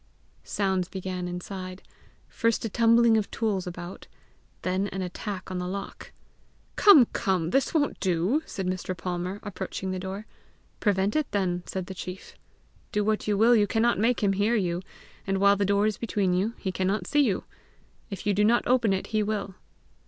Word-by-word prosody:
Sounds 190 -3 0
began 185 -1 -4
inside 185 +1 -6 0.4
first 230 -1 0
a - - -1
tumbling 230 +1 +4
of 210 - -1
tools 205 -5 -1
about, 175 +1 -8 0.6
then 185 +2 0
an 190 -1 -4
attack 185 +1 -5
on 185 - -2
the 180 - -3
lock. 195 +2 -6 0.6
"Come! 320 - +8
come! 180 -4 0
this 270 +4 +2
won't 290 -3 0
do!" 185 - +1
said 190 - -4
Mr. 185 0 -3
Palmer, 180 +3 -3
approaching 190 -1 -4
the 185 - -3
door. 190 +3 -5 0.5
"Prevent 200 -1 +1
it 310 -2 +1
then," 185 -3 0
said 190 -1 -4
the 190 - -7
chief. 185 +1 -8 0.6
"Do 210 - +1
what 215 0 0
you 205 -1 +2
will 230 +3 +6
you 210 -2 +3
cannot 230 0 +2
make 230 +1 +2
him 195 -1 +3
hear 205 +4 +2
you, 175 -4 0 0.5
and 195 0 +1
while 200 +1 +5
the 200 0 0
door 200 +1 +2
is 215 -2 -1
between 200 -5 0
you, 200 +6 0
he 190 - -3
cannot 190 +1 -1
see 295 +8 +3
you! 220 -9 +1 0.7
If 195 - -7
you 205 - +2
do 205 +2 +2
not 235 +3 +3
open 240 -5 +3
it, 190 - -2
he 215 - +3
will!" 205 -2 -2
195 Hz, 180 wpm, -27 LUFS, 185-215 Hz, 0.7 s, Come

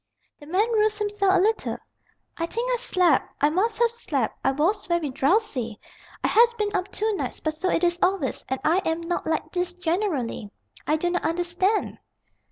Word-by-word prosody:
The 290 - -13
man 405 +8 +1
roused 425 -1 +2
himself 410 -2 +1
a - - +4
little. 435 +4 +1 0.6
"I 335 - -2
think 475 +6 -2
I - - +1
slept. 365 - +2
I 290 +2 +3
must 425 +7 +1
have 470 -1 +3
slept. 295 - -2
I - - +3
was 350 +9 0
very 340 -5 0
drowsy. 265 - 0 0.4
I - - +3
had 470 +2 +6
been 415 -1 -1
up 375 +2 -2
two 435 +1 0
nights; - - -4
but 310 - -2
so 350 +4 -2
it 345 - +1
is 345 0 +2
always, 365 -8 0
and 265 0 -1
I 335 +4 +3
am 325 -3 -1
not 345 +1 -3
like 315 -1 -1
this 355 -1 -2
generally. 325 - -2 0.4
I 305 - +3
do 350 +3 -1
not 360 - 0
understand." 350 +5 0
360 Hz, 190 wpm, -25 LUFS, 315-420 Hz, 0.6 s, had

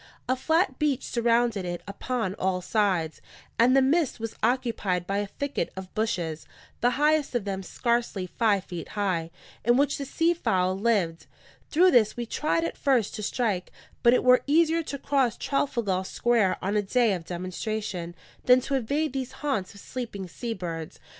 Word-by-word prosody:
A 255 - +2
flat 320 +8 +1
beach 290 -4 +1
surrounded 235 -3 +1
it 175 -1 -4
upon 210 0 -2
all 185 -1 +1
sides; 180 -6 0 0.4
and 250 +3 +5
the 270 - +5
midst 295 0 +1
was 225 0 -4
occupied 225 -7 0
by 195 +2 -1
a 205 - -2
thicket 280 -4 -3
of 190 -1 -8
bushes, 175 -8 -2 0.3
the 245 - +3
highest 300 -2 +2
of 230 -4 0
them 195 -1 -3
scarcely 235 -1 -1
five 200 0 +1
feet 175 -3 -7
high, 180 -5 0 0.3
in 240 +2 +4
which 285 +1 +2
the 280 - -3
sea 330 +5 +2
fowl 185 - +1
lived. 195 -6 0 0.4
Through 360 +4 +5
this 230 -4 +4
we 240 - -2
tried 305 +7 0
at 335 - -3
first 255 -7 +2
to - - -5
strike; 210 -4 -1 0.3
but 235 +1 +6
it - - +1
were 250 0 +6
easier 325 +2 +3
to 290 -3 -5
cross 270 -5 +1
Trafalgar 235 -9 0
Square 225 -1 +1
on 200 +3 0
a 210 - +3
day 225 +2 +2
of 175 -3 -4
demonstration 185 0 -4 0.3
than 250 0 +7
to 275 - -4
invade 280 +3 0
these 260 -2 -4
haunts 240 -11 -2
of 200 - -12
sleeping 225 -7 -6
sea 230 +6 -5
birds. 165 -3 -6
230 Hz, 175 wpm, -27 LUFS, 190-260 Hz, 0.4 s, than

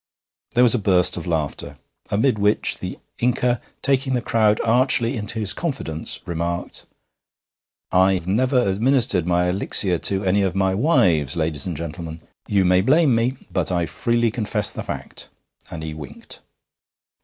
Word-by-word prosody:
There 125 - +5
was 120 - +5
a 125 - +1
burst 90 -3 +2
of 85 - -6
laughter, 75 -3 -3 0.3
amid 110 +2 +1
which 105 +1 +1
the - - -6 0.2
Inca, 125 -1 +1 0.2
taking 135 0 +1
the 125 - 0
crowd 110 -3 +2
archly 120 +1 +2
into 110 0 -5
his 105 -3 0
confidence, 125 - -4
remarked: 85 +1 -4 1.0
'I've 95 -1 +3
never 125 +6 +2
administered 105 - +1
my 90 0 +2
elixir 90 -1 0
to 95 0 -1
any 95 +2 +2
of 95 -2 0
my 95 -1 +2
wives, 95 - +2
ladies 80 -2 -2
and 85 -4 -4
gentlemen. 80 0 -6 0.3
You 100 -2 +2
may 90 +1 +4
blame 140 - +4
me, 115 +3 +1 0.2
but - - -1
I 85 -2 +1
freely 115 - 0
confess 105 -2 -2
the - - -6
fact;' - - -7 0.4
and 80 -2 -7
he 80 -1 -5
winked. 75 -2 -10
100 Hz, 155 wpm, -22 LUFS, 85-120 Hz, 1.0 s, There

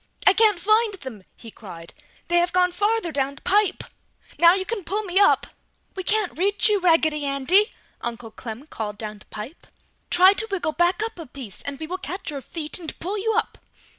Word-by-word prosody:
"I 390 - +7
can't 430 -2 +4
find 430 +3 +2
them!" 260 - -9 0.2
he 230 - -11
cried. 170 -7 -11 0.3
"They 345 - +2
have 345 +1 +2
gone 360 0 +3
farther 415 -2 0
down 275 -1 -1
the - - -15
pipe! 410 +2 +2 0.6
Now 340 +1 +7
you 380 -1 -2
can 445 -3 -3
pull 410 +6 -2
me 380 -1 +1
up!" 405 - +4 0.5
"We 380 - -3
can't 420 0 0
reach 400 +6 +3
you, 415 -1 +3
Raggedy 315 -4 +2
Andy!" 285 - +3 0.3
Uncle 235 -1 -5
Clem 230 +4 -8
called 210 -8 -6
down 215 -1 -7
the - - -13
pipe. 225 +10 -9 0.4
"Try 370 +2 +6
to 440 +2 0
wiggle 375 -5 -1
back 350 +6 +1
up 445 -5 -5
a 325 - -8
piece 250 -6 -8
and 280 -1 -6
we 320 - -4
will 365 +4 -5
catch 370 -3 -5
your 280 -2 -5
feet 310 +6 -6
and 325 -3 -7
pull 395 +5 -3
you 445 +2 0
up!" - - -1
345 Hz, 205 wpm, -23 LUFS, 275-400 Hz, 0.6 s, I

